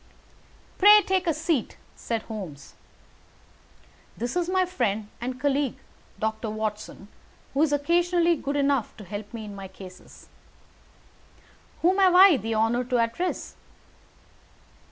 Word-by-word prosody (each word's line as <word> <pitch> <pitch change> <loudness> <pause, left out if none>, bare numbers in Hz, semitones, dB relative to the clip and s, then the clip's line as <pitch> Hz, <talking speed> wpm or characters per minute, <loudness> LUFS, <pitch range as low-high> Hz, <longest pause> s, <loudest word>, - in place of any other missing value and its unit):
"Pray 415 +1 +8
take 375 -1 0
a 330 - +3
seat," 315 -5 -1 0.2
said 230 -2 -4
Holmes. 185 -11 -8 1.4
"This 240 +5 -4
is 355 -1 0
my 370 0 +2
friend 220 - -2
and 255 +1 -4
colleague, 280 -1 0 0.4
Doctor 220 +1 -2
Watson, 215 -2 -5 0.5
who 275 - +1
is 310 -2 +3
occasionally 340 +3 +2
good 280 -1 -4
enough 280 -4 0
to 215 - -10
help 205 +2 -7
me 225 -2 -7
in 205 -1 -9
my 195 -1 -8
cases. 185 -1 -14 1.6
Whom 370 +3 +3
have 370 -2 +5
I 370 -4 +8
the 225 0 -3
honour 225 +3 +1
to 250 0 0
address?" 230 +11 -2
255 Hz, 130 wpm, -25 LUFS, 215-345 Hz, 1.6 s, Pray